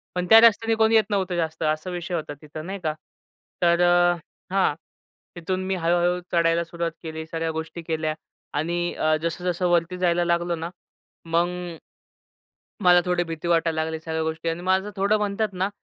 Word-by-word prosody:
पण 180 Hz, 0 st, -1 dB
त्या 225 Hz, -, +10 dB
रस्त्याने 225 Hz, 0 st, +5 dB
कोणी 220 Hz, 0 st, +3 dB
येत 220 Hz, -, +6 dB
नव्हतं 190 Hz, -3 st, 0 dB
जास्त 160 Hz, -1 st, -2 dB
असा 155 Hz, +4 st, -1 dB
विषय 175 Hz, 0 st, -5 dB
होता 155 Hz, -2 st, -4 dB
तिथं 155 Hz, +1 st, -8 dB
नाही 195 Hz, +1 st, -5 dB
का, 155 Hz, -1 st, 0 dB, 0.7 s
तर 170 Hz, 0 st, +4 dB
अ, 175 Hz, 0 st, +5 dB, 0.4 s
हां, 190 Hz, -6 st, +3 dB, 0.6 s
तिथून 185 Hz, +2 st, -3 dB
मी 190 Hz, -, 0 dB
हळू 170 Hz, 0 st, +1 dB
हळू 175 Hz, +1 st, +1 dB
चढायला 170 Hz, 0 st, +2 dB
सुरुवात 170 Hz, 0 st, -3 dB
केली, 160 Hz, 0 st, -6 dB
सगळ्या 165 Hz, 0 st, -3 dB
गोष्टी 160 Hz, +2 st, -5 dB
केल्या 160 Hz, -1 st, -2 dB, 0.4 s
आणि 175 Hz, +3 st, -1 dB
अ, 155 Hz, 0 st, +1 dB
जसं-जसं 180 Hz, +1 st, -1 dB
वरती 175 Hz, +1 st, +1 dB
जायला 175 Hz, -1 st, +2 dB
लागलो 170 Hz, 0 st, +1 dB
ना, 165 Hz, +1 st, -5 dB, 0.6 s
मग 170 Hz, +1 st, +2 dB, 1.4 s
मला 180 Hz, 0 st, +7 dB
थोडी 180 Hz, -1 st, +1 dB
भीती 165 Hz, 0 st, -6 dB
वाटायला 165 Hz, -2 st, +2 dB
लागली, 160 Hz, 0 st, -4 dB
सगळ्या 160 Hz, 0 st, -3 dB
गोष्टी 160 Hz, +1 st, -2 dB
अन् 165 Hz, +2 st, -3 dB
माझं 190 Hz, +2 st, +1 dB
थोडं 200 Hz, +2 st, +2 dB
म्हणतात 210 Hz, 0 st, -1 dB
ना, 190 Hz, +2 st, -1 dB
170 Hz, 175 wpm, -24 LUFS, 165-180 Hz, 1.4 s, त्या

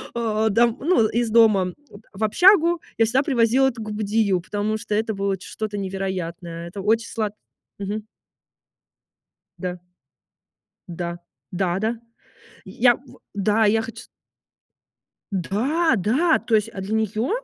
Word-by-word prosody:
а, 220 Hz, -1 st, +1 dB
дом 235 Hz, +4 st, +3 dB
ну 280 Hz, -8 st, +3 dB
из 235 Hz, 0 st, 0 dB
дома 215 Hz, -5 st, +4 dB, 0.2 s
вот 205 Hz, -, -14 dB
в 205 Hz, +3 st, -4 dB
общагу, 345 Hz, -, +5 dB, 0.2 s
я 225 Hz, -, +4 dB
всегда 255 Hz, +5 st, +2 dB
привозила 255 Hz, 0 st, +3 dB
это 235 Hz, -3 st, -4 dB
губадию, 210 Hz, -2 st, 0 dB
потому 210 Hz, +3 st, -2 dB
что 215 Hz, -2 st, -3 dB
это 220 Hz, 0 st, 0 dB
было 195 Hz, -1 st, -1 dB
ч -, -, -12 dB
что-то 215 Hz, -1 st, -4 dB
невероятное. 180 Hz, -3 st, -4 dB
Это 195 Hz, +2 st, -7 dB
очень 225 Hz, +3 st, +1 dB
слад 215 Hz, -2 st, -2 dB, 0.5 s
Мгм. 205 Hz, +2 st, -4 dB, 1.6 s
Да. 180 Hz, -1 st, -4 dB, 1.1 s
Да, 175 Hz, 0 st, -5 dB, 0.3 s
да, 180 Hz, 0 st, 0 dB
да. 225 Hz, +2 st, -2 dB, 0.7 s
Я 240 Hz, 0 st, +3 dB
в 270 Hz, -, -18 dB
да, 210 Hz, +2 st, +2 dB
я 220 Hz, +2 st, +3 dB
хочу 225 Hz, -, -8 dB
с -, -, -18 dB, 1.3 s
Да, 255 Hz, -, +1 dB
да, 275 Hz, -, +2 dB
то 225 Hz, -, -2 dB
есть, 215 Hz, +1 st, +3 dB
а 190 Hz, -4 st, -7 dB
для 200 Hz, +3 st, -5 dB
нее 220 Hz, -, 0 dB
215 Hz, 140 wpm, -23 LUFS, 195-230 Hz, 1.6 s, общагу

